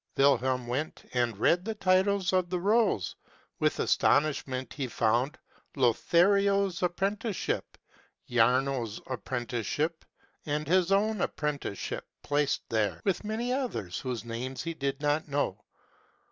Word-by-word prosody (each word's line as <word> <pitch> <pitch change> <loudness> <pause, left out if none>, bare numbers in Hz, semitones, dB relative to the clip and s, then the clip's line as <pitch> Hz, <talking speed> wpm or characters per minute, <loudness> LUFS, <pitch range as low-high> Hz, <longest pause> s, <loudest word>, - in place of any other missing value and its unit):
Wilhelm 130 -2 +3
went, 130 +6 -3
and 120 -4 0
read 175 - +3
the 220 +2 -3
titles 190 -1 +2
of 185 -1 +2
the 180 0 -1
rolls. 200 - +2 0.4
With - - +1
aston 145 - +4
ishment 130 -4 -4
he 135 -3 -3
found, 120 +4 +1 0.4
"Lothario's 195 - +3
Apprenticeship," 195 +4 -1 0.5
"Jarno's 125 -1 +2
Apprenticeship," 125 +6 -2 0.4
and 150 0 -1
his 185 +2 +3
own 210 0 +2
Apprenticeship 145 -9 -3 0.2
placed 145 -1 0
there, 105 -3 0
with 195 0 0
many 225 +4 -2
others 240 - -3
whose 125 -3 -4
names 125 +3 -4
he 165 - -3
did 140 -1 -3
not 150 +2 +1
know. 140 -8 -1
145 Hz, 120 wpm, -29 LUFS, 125-185 Hz, 0.5 s, aston